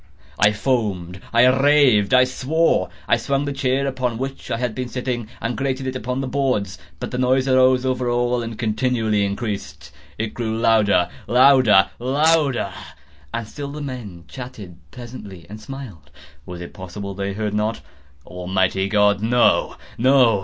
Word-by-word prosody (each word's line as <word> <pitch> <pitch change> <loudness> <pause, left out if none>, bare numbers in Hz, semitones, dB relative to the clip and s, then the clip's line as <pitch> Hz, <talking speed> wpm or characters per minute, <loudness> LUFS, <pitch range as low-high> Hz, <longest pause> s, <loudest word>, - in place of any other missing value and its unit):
I 105 - +5
foamed—I 105 -2 0
raved—I 130 -3 +4
swore! 130 - +1 0.2
I - - +4
swung 140 +4 -1
the 145 - -3
chair 135 0 0
upon 130 -3 -2
which 135 +2 -6
I - - -1
had 120 -2 -2
been 130 +1 -4
sitting, 125 -2 -3
and 115 +1 -3
grated 135 -1 -2
it 130 0 -3
upon 125 +2 -3
the 135 - -3
boards, 125 -8 -1 0.2
but - - -5
the 125 - -3
noise 130 +1 +2
arose 130 0 +4
over 125 -1 0
all 120 0 +1
and 115 -1 -6
continually 110 -2 0
increased. 100 - -4 0.3
It 110 0 -3
grew 110 -2 -3
louder—louder—louder! 120 - +3 0.6
And 115 -2 -4
still 140 +4 -7
the 150 - -7
men 120 - -7
chatted 105 -3 -9
pleasantly, 105 - -10
and 105 +3 -10
smiled. 110 - -9 0.4
Was 90 -1 -7
it 85 - -9
possible 95 +2 -7
they 100 +1 -3
heard 105 0 -3
not? 105 +2 -1 0.4
Almighty 95 +1 -1
God!—no, 105 +3 +3 0.2
no! 125 -4 +4
120 Hz, 145 wpm, -21 LUFS, 100-130 Hz, 0.6 s, I